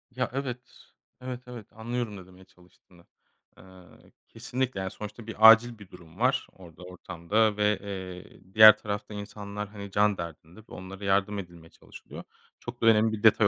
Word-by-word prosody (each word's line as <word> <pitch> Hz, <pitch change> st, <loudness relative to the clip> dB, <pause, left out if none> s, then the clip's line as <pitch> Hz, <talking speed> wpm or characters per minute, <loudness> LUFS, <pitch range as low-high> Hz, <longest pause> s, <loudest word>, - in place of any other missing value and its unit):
Ya, 125 Hz, 0 st, -1 dB
evet. 130 Hz, -2 st, -3 dB, 0.6 s
Evet, 125 Hz, -1 st, -6 dB
evet 120 Hz, -4 st, -10 dB
anlıyorum 115 Hz, -1 st, -4 dB
ne 95 Hz, -, -11 dB
demeye 95 Hz, 0 st, -17 dB
çalıştığını. 90 Hz, -1 st, -24 dB, 0.5 s
Eee, -, -, -16 dB, 0.6 s
kesinlikle, 120 Hz, 0 st, -4 dB
yani, 95 Hz, 0 st, -4 dB
sonuçta 105 Hz, +1 st, -9 dB
bir 110 Hz, 0 st, +7 dB
acil 115 Hz, +1 st, +5 dB
bir 100 Hz, -3 st, -14 dB
durum 85 Hz, 0 st, -15 dB
var 130 Hz, +3 st, +1 dB
orada 90 Hz, -1 st, -15 dB
ortamda 95 Hz, +4 st, -1 dB
ve, 105 Hz, 0 st, +1 dB
eee, 95 Hz, -1 st, -9 dB
diğer 110 Hz, 0 st, +9 dB
tarafta 105 Hz, 0 st, -5 dB
insanlar, 105 Hz, 0 st, -7 dB
hani, 100 Hz, -1 st, -9 dB
can 105 Hz, 0 st, +2 dB
derdinde 85 Hz, +2 st, -9 dB
ve -, -, -15 dB
onlara 95 Hz, +2 st, -9 dB
yardım 100 Hz, +1 st, +1 dB
edilmeye 85 Hz, -3 st, -11 dB
çalışılıyor. -, -, -13 dB, 0.4 s
Çok 120 Hz, 0 st, -9 dB
da -, -, +1 dB
önemli 110 Hz, 0 st, +5 dB
bir 105 Hz, -, -6 dB
detay 110 Hz, -1 st, +5 dB
105 Hz, 165 wpm, -27 LUFS, 95-110 Hz, 0.6 s, diğer